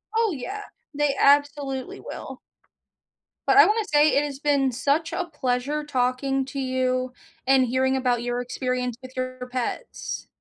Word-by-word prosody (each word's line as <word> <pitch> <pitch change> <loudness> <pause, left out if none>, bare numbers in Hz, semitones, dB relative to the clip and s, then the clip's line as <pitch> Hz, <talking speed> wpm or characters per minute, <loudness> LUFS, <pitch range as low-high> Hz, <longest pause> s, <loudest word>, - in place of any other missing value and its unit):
Oh, 450 -3 +3
yeah, 385 +9 -5 0.3
they 290 -1 +1
absolutely 285 -2 +2
will. - - -8 1.1
But, 400 - +5
I - - +10
wanna 430 +1 +1
say, 295 +1 +6
it 285 - +3
has 280 -2 -5
been 280 -3 +2
such 285 +7 0
a 360 - -1
pleasure 290 -1 -1
talking 265 0 0
to 275 +1 -6
you 255 -1 0 0.3
and 265 -1 +5
hearing 260 +2 +1
about 245 -2 +1
your 245 0 -1
experience 250 -1 -2
with 255 0 -11
your 255 0 -4
pets. 255 -2 -4
265 Hz, 150 wpm, -25 LUFS, 255-290 Hz, 1.1 s, I